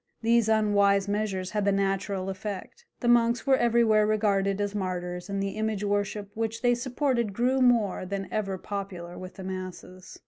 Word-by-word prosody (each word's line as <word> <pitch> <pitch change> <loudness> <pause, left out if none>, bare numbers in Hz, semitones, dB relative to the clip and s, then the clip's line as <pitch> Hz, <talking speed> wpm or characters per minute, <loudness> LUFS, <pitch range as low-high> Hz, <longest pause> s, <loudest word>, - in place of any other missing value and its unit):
These 230 -1 +3
unwise 200 -2 +3
measures 200 -3 -2
had 210 -1 0
the 200 - +3
natural 195 -1 -1
effect: 205 - -7 0.2
the 240 - -1
monks 235 0 +3
were 270 -1 +5
everywhere 230 -3 +3
regarded 200 -2 +1
as 205 0 -1
martyrs, 180 -2 -4
and 195 0 -1
the 195 - -1
image 215 0 -2
worship 205 0 -1
which 225 +1 -3
they 245 0 +4
supported 245 -3 -1
grew 255 +5 +1
more 235 -7 +3
than 195 0 -3
ever 195 -3 -2
popular 185 -3 -6
with 185 0 -9
the 190 - -8
masses. 185 0 -7
205 Hz, 170 wpm, -27 LUFS, 195-225 Hz, 0.2 s, were